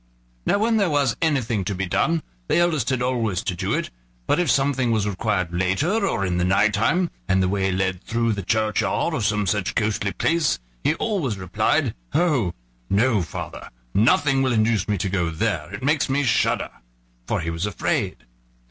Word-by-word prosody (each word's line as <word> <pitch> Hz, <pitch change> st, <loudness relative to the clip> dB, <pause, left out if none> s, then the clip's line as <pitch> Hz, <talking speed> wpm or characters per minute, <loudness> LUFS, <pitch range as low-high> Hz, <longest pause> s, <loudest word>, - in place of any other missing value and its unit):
Now -, -, +3 dB
when 220 Hz, +2 st, +2 dB
there 200 Hz, -4 st, +2 dB
was 140 Hz, -6 st, +1 dB
anything 125 Hz, -10 st, +1 dB
to 100 Hz, -, -2 dB
be 95 Hz, +1 st, -2 dB
done, 160 Hz, -, +1 dB, 0.2 s
the -, -, +2 dB
eldest 160 Hz, -8 st, +2 dB
had 130 Hz, -2 st, 0 dB
always 115 Hz, -7 st, 0 dB
to 90 Hz, -, -2 dB
do -, -, -2 dB
it; -, -, -3 dB, 0.3 s
but -, -, +2 dB
if 175 Hz, -4 st, +1 dB
something 135 Hz, 0 st, +2 dB
was 110 Hz, -3 st, +1 dB
required 95 Hz, -3 st, -1 dB
later 145 Hz, -, +1 dB
or 100 Hz, -, 0 dB
in 90 Hz, -1 st, -1 dB
the -, -, +1 dB
night 100 Hz, +3 st, +3 dB
time, 165 Hz, -, +1 dB, 0.2 s
and 95 Hz, -1 st, +3 dB
the -, -, +2 dB
way 95 Hz, 0 st, 0 dB
led 95 Hz, 0 st, -1 dB
through 115 Hz, -1 st, 0 dB
the 100 Hz, -, -3 dB
churchyard 110 Hz, +2 st, 0 dB
or -, -, -1 dB
some 105 Hz, -1 st, +1 dB
such 100 Hz, 0 st, -1 dB
ghostly 105 Hz, -2 st, 0 dB
place, 165 Hz, -, +1 dB, 0.3 s
he 155 Hz, -, +2 dB
always 165 Hz, -, -1 dB
replied: 95 Hz, -1 st, 0 dB, 0.2 s
"Oh! 135 Hz, -, +2 dB, 0.3 s
no, 110 Hz, +1 st, +3 dB
father: 85 Hz, -, -7 dB, 0.2 s
nothing 135 Hz, +5 st, +3 dB
will 130 Hz, -2 st, +2 dB
induce 110 Hz, -2 st, +2 dB
me 105 Hz, -2 st, 0 dB
to 95 Hz, -, -1 dB
go 90 Hz, -3 st, 0 dB
there, 85 Hz, -2 st, -2 dB
it 105 Hz, +4 st, -7 dB
makes 150 Hz, +1 st, +1 dB
me 140 Hz, +2 st, +1 dB
shudder!" 125 Hz, -, +1 dB, 0.6 s
for -, -, 0 dB
he 85 Hz, 0 st, -3 dB
was 85 Hz, +4 st, -2 dB
afraid. 105 Hz, -, -1 dB
110 Hz, 190 wpm, -23 LUFS, 95-135 Hz, 0.6 s, Now